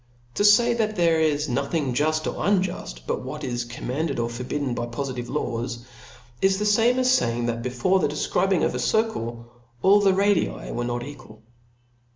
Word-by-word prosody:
To 205 Hz, -, 0 dB
fay 235 Hz, +3 st, +6 dB
that 215 Hz, -2 st, -1 dB
there 165 Hz, -3 st, +3 dB
is 150 Hz, -1 st, +1 dB
nothing 140 Hz, +1 st, -1 dB
juft 155 Hz, +4 st, 0 dB
or -, -, -2 dB
p, -, -, -8 dB
^• -, -, -2 dB, 0.3 s
unjuft -, -, -9 dB
but -, -, -2 dB
what 150 Hz, +4 st, -6 dB
is 120 Hz, -2 st, -2 dB
commanded 135 Hz, +5 st, -3 dB
or 115 Hz, 0 st, -1 dB
forbidden 125 Hz, +2 st, -3 dB
by 120 Hz, -, -3 dB
po 120 Hz, +4 st, -4 dB
lidve 125 Hz, -3 st, -5 dB
laws, 120 Hz, -4 st, -3 dB, 0.6 s
is 195 Hz, 0 st, +3 dB
the 210 Hz, -, -1 dB
fame 225 Hz, +4 st, +3 dB
as 255 Hz, 0 st, +2 dB
faying, 120 Hz, 0 st, -1 dB
that 115 Hz, 0 st, -2 dB
before 125 Hz, +10 st, +1 dB
the -, -, +2 dB
defcribing 180 Hz, +4 st, +1 dB
of -, -, -1 dB
a -, -, -3 dB
circle 120 Hz, -, -1 dB, 0.4 s
all 200 Hz, +2 st, +6 dB
the 195 Hz, -2 st, +3 dB
radii 200 Hz, -2 st, +1 dB
were 120 Hz, -, -3 dB
not 120 Hz, 0 st, -3 dB
equal. 110 Hz, -5 st, -12 dB
145 Hz, 190 wpm, -24 LUFS, 120-190 Hz, 0.6 s, fay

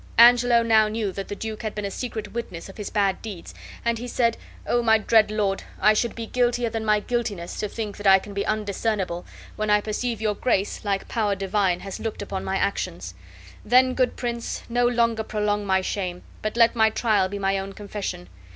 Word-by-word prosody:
Angelo 240 Hz, 0 st, +7 dB
now 220 Hz, -2 st, +5 dB
knew 215 Hz, -2 st, -2 dB
the 195 Hz, +1 st, -4 dB
duke 215 Hz, +2 st, -6 dB
had 215 Hz, -2 st, -4 dB
been 210 Hz, -1 st, -3 dB
a 200 Hz, -, -3 dB
secret 220 Hz, -2 st, -5 dB
witness 230 Hz, -8 st, -5 dB
of 195 Hz, -, -12 dB
his 210 Hz, -, -5 dB
bad 200 Hz, -3 st, +1 dB
deeds, 200 Hz, -6 st, -8 dB, 0.3 s
and 235 Hz, -1 st, +1 dB
be 245 Hz, -, -5 dB
said: 235 Hz, -1 st, +1 dB, 0.3 s
"O 240 Hz, -, +2 dB
my 225 Hz, -1 st, +5 dB
dread 220 Hz, 0 st, +4 dB
lord, 205 Hz, -2 st, 0 dB, 0.2 s
I 215 Hz, +2 st, +5 dB
should 235 Hz, +2 st, 0 dB
be 230 Hz, -, -5 dB
guiltier 240 Hz, 0 st, 0 dB
than 225 Hz, 0 st, -3 dB
my 210 Hz, -1 st, +2 dB
guiltiness, 210 Hz, -8 st, -3 dB
to 210 Hz, -, -2 dB
think 210 Hz, -2 st, -5 dB
I 195 Hz, -1 st, +7 dB
can 200 Hz, +1 st, -8 dB
be 200 Hz, 0 st, -1 dB
undiscernible, 205 Hz, -4 st, -2 dB, 0.3 s
when 215 Hz, 0 st, -1 dB
I 210 Hz, 0 st, +5 dB
perceive 220 Hz, +2 st, -3 dB
your 215 Hz, -1 st, 0 dB
Grace, 205 Hz, -2 st, -1 dB
like 200 Hz, -2 st, -1 dB
power 210 Hz, -3 st, 0 dB
divine, 195 Hz, -2 st, 0 dB
has 195 Hz, -1 st, -6 dB
looked 220 Hz, -2 st, -4 dB
upon 195 Hz, -1 st, -4 dB
my 195 Hz, -, -1 dB
actions. 90 Hz, -, -2 dB, 0.5 s
Then, 255 Hz, +2 st, +4 dB
good 255 Hz, -1 st, +1 dB
prince, 235 Hz, -1 st, -4 dB
no 240 Hz, +1 st, +2 dB
longer 230 Hz, -2 st, +2 dB
prolong 210 Hz, -1 st, -1 dB
my 190 Hz, 0 st, +3 dB
shame, 185 Hz, -2 st, -3 dB, 0.2 s
but 215 Hz, +2 st, -3 dB
let 230 Hz, 0 st, +5 dB
my 220 Hz, -1 st, +5 dB
trial 215 Hz, -4 st, +1 dB
be 200 Hz, -, -4 dB
my 195 Hz, 0 st, 0 dB
own 195 Hz, 0 st, -6 dB
confession. 200 Hz, -, -5 dB
215 Hz, 205 wpm, -24 LUFS, 195-230 Hz, 0.5 s, Angelo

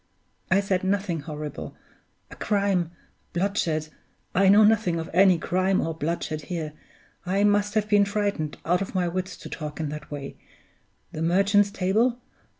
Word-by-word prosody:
I 185 Hz, +2 st, +4 dB
said 190 Hz, -2 st, -1 dB
nothing 190 Hz, -3 st, 0 dB
horrible. 150 Hz, 0 st, -7 dB, 0.6 s
A -, -, -9 dB
crime! 200 Hz, -5 st, 0 dB, 0.4 s
Bloodshed! 170 Hz, -5 st, 0 dB, 0.4 s
I 190 Hz, +1 st, +4 dB
know 205 Hz, +2 st, +7 dB
nothing 210 Hz, -6 st, +3 dB
of 160 Hz, -, -6 dB
any 185 Hz, 0 st, +6 dB
crime 185 Hz, +3 st, +1 dB
or 165 Hz, -, -1 dB
bloodshed 155 Hz, 0 st, -3 dB
here 160 Hz, -4 st, -4 dB, 0.5 s
I 195 Hz, +3 st, +1 dB
must 205 Hz, +1 st, +2 dB
have 210 Hz, -1 st, +1 dB
been 205 Hz, -1 st, +4 dB
frightened 200 Hz, -7 st, -2 dB
out 180 Hz, +3 st, +2 dB
of 195 Hz, -, -5 dB
my 180 Hz, -1 st, +1 dB
wits 185 Hz, +2 st, -3 dB
to -, -, -10 dB
talk 150 Hz, -1 st, -6 dB
in 155 Hz, -2 st, -2 dB
that 150 Hz, 0 st, -7 dB
way! 140 Hz, -2 st, -7 dB, 0.7 s
The 155 Hz, -, -6 dB
Merchant's 200 Hz, +4 st, +3 dB
Table? 215 Hz, +6 st, +1 dB
185 Hz, 155 wpm, -25 LUFS, 165-200 Hz, 0.7 s, know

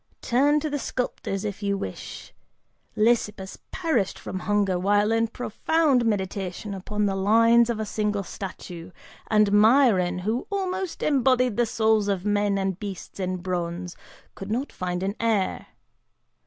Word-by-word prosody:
Turn 285 Hz, +5 st, +3 dB
to 310 Hz, -, -2 dB
the 290 Hz, -, -1 dB
sculptors 215 Hz, -6 st, -3 dB
if 205 Hz, 0 st, -4 dB
you 200 Hz, -1 st, 0 dB
will; 95 Hz, -, -4 dB, 1.0 s
Lysippus 210 Hz, -3 st, 0 dB
perished 315 Hz, -, -1 dB
from 190 Hz, -, -6 dB
hunger 200 Hz, -2 st, +1 dB
while 205 Hz, +3 st, +2 dB
in 225 Hz, 0 st, +2 dB
profound 255 Hz, +3 st, +1 dB
meditation 195 Hz, -1 st, -2 dB
upon 210 Hz, +2 st, -2 dB
the 195 Hz, -, +1 dB
lines 230 Hz, +4 st, +4 dB
of 230 Hz, -2 st, -1 dB
a 220 Hz, -, -2 dB
single 210 Hz, -1 st, -1 dB
statue, 180 Hz, -2 st, -8 dB, 0.4 s
and 210 Hz, -2 st, +3 dB
Myron, 210 Hz, -4 st, +4 dB
who 215 Hz, +7 st, -2 dB
almost 380 Hz, -2 st, -3 dB
embodied 255 Hz, -4 st, +2 dB
the 240 Hz, -1 st, +2 dB
souls 220 Hz, -2 st, +2 dB
of 195 Hz, -2 st, -1 dB
men 205 Hz, -1 st, +1 dB
and 190 Hz, -1 st, -2 dB
beasts 200 Hz, -2 st, -7 dB
in 185 Hz, -1 st, -2 dB
bronze, 175 Hz, -1 st, -3 dB, 0.4 s
could 195 Hz, -, -8 dB
not 250 Hz, +6 st, -2 dB
find 180 Hz, 0 st, -3 dB
an 195 Hz, +1 st, -1 dB
heir. 220 Hz, -4 st, 0 dB
210 Hz, 145 wpm, -25 LUFS, 190-235 Hz, 1.0 s, lines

